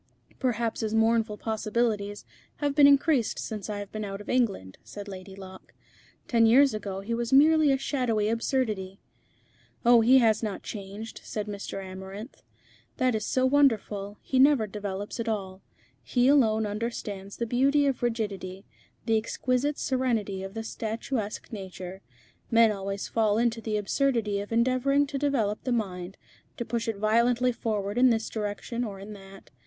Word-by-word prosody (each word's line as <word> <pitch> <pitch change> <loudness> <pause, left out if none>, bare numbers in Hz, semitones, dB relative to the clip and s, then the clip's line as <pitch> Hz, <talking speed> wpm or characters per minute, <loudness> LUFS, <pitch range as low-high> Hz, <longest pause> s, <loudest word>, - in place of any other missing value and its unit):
'" - - -31
"Perhaps 235 -3 -1
his 220 0 -1
mournful 225 -1 +2
possibilities 215 -1 -1 0.3
have 290 -1 -1
been 285 -1 +7
increased 280 -3 +3
since 215 -1 -5
I 210 - -3
have 205 -1 -7
been 215 0 -4
out 195 -1 -5
of 205 - -10
England," 200 - 0
said 205 0 -9
Lady 190 0 -9
Locke. 190 -1 -12 0.5
"Ten 230 -2 +4
years 270 +3 +6
ago 200 -2 -4
he 220 +4 -4
was 235 0 -2
merely 305 +2 +6
a 270 - +3
shadowy 250 -6 0
absurdity." 220 -5 -1 0.9
"Oh! 240 -1 +7
he 250 +4 +6
has 220 -4 +4
not 210 -3 -4
changed," 205 +2 -7
said 210 -1 -4
Mr. 200 -1 -6
Amarinth. 190 +5 -9 0.6
"That 255 -2 +2
is 215 -1 -2
so 260 0 +2
wonderful. 215 -7 +2
He 260 - 0
never 275 -4 +5
develops 205 +1 -5
at 230 - -2
all. 190 -3 -4 0.4
He 245 0 +1
alone 220 -6 +4
understands 205 -2 -5
the 235 - -1
beauty 275 +5 +3
of 270 -3 0
rigidity, 205 -5 -3 0.4
the 225 -1 +3
exquisite 255 +5 -1
serenity 230 -7 -1
of 195 +2 -7
the 225 - -3
statuesque 220 +1 -4
nature. 190 -2 -7 0.5
Men 230 -2 +5
always 195 -1 -4
fall 215 -2 +1
into 230 0 +1
the 215 -1 -1
absurdity 215 -1 0
of 205 +2 -7
endeavouring 255 +4 +2
to 280 -1 -4
develop 240 -8 0
the 255 - -2
mind, 190 -5 -3 0.4
to 235 - -3
push 230 +1 -2
it 225 -3 -2
violently 235 +4 +2
forward 210 -2 -2
in 255 0 +6
this 225 -2 0
direction 215 +3 -3
or 200 -4 -6
in 205 +2 -8
that. 195 -1 -14
220 Hz, 165 wpm, -27 LUFS, 205-245 Hz, 0.9 s, been